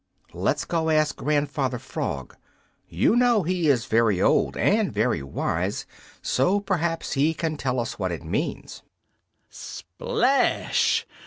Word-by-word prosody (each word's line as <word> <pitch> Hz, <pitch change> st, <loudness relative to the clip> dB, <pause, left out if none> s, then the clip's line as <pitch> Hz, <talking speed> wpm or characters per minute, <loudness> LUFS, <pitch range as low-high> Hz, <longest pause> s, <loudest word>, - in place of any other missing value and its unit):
Let's -, -, -1 dB
go 165 Hz, -1 st, -1 dB
ask 155 Hz, -1 st, +2 dB
Grandfather 145 Hz, -3 st, -1 dB
Frog. 70 Hz, -, -5 dB, 0.5 s
You -, -, +2 dB
know 240 Hz, -4 st, +4 dB
he 175 Hz, -1 st, 0 dB
is 125 Hz, -5 st, +2 dB
very 110 Hz, -4 st, +2 dB
old -, -, +2 dB
and 210 Hz, 0 st, +2 dB
very 110 Hz, -, 0 dB
wise, 70 Hz, -, -2 dB, 0.4 s
so 180 Hz, +11 st, +2 dB
perhaps 170 Hz, -4 st, -1 dB
he 150 Hz, +4 st, +2 dB
can 160 Hz, 0 st, -2 dB
tell 130 Hz, -3 st, -1 dB
us 115 Hz, -2 st, -4 dB
what 95 Hz, -2 st, -1 dB
it 85 Hz, -, -5 dB
means." 80 Hz, -, -3 dB, 0.7 s
Splash! -, -, 0 dB
150 Hz, 130 wpm, -25 LUFS, 115-170 Hz, 0.7 s, know